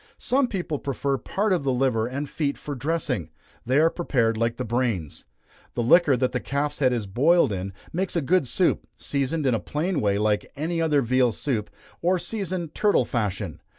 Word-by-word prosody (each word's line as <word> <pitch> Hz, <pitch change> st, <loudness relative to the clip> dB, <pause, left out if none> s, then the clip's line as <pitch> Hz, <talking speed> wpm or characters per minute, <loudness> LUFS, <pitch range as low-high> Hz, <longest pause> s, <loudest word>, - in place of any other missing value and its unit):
Some 265 Hz, 0 st, +1 dB
people 175 Hz, -, -3 dB
prefer 140 Hz, 0 st, -1 dB
part 205 Hz, -, 0 dB
of 175 Hz, -, 0 dB
the 135 Hz, -, +1 dB
liver 125 Hz, -3 st, +1 dB
and 140 Hz, +4 st, -4 dB
feet 140 Hz, -1 st, -2 dB
for 145 Hz, -, -6 dB
dressing 155 Hz, +5 st, -1 dB, 0.4 s
they 130 Hz, +2 st, +3 dB
are 165 Hz, +1 st, +4 dB
prepared 120 Hz, -10 st, +1 dB
like 115 Hz, +1 st, 0 dB
the 125 Hz, -, -3 dB
brains. 115 Hz, -, -2 dB, 0.5 s
The 120 Hz, -, 0 dB
liquor 145 Hz, +1 st, +5 dB
that 125 Hz, +1 st, +1 dB
the 125 Hz, -, -1 dB
calf's 140 Hz, +3 st, -2 dB
head 130 Hz, -3 st, +3 dB
is 120 Hz, -4 st, -1 dB
boiled 140 Hz, -, +3 dB
in, 95 Hz, 0 st, -3 dB, 0.2 s
makes 185 Hz, +2 st, -1 dB
a 170 Hz, -, +2 dB
good 175 Hz, -1 st, +2 dB
soup, 180 Hz, +8 st, +1 dB
seasoned 140 Hz, +2 st, -1 dB
in 130 Hz, -, +3 dB
a 115 Hz, -, +1 dB
plain 160 Hz, -, -2 dB
way 100 Hz, -1 st, +2 dB
like 105 Hz, 0 st, 0 dB
any 165 Hz, +3 st, -2 dB
other 150 Hz, -4 st, +2 dB
veal 125 Hz, 0 st, +3 dB
soup, 110 Hz, -2 st, -2 dB, 0.3 s
or 180 Hz, +2 st, +2 dB
seasoned 180 Hz, -3 st, -4 dB
turtle 210 Hz, -1 st, +3 dB
fashion. 100 Hz, -, -3 dB
140 Hz, 190 wpm, -25 LUFS, 120-165 Hz, 0.5 s, liquor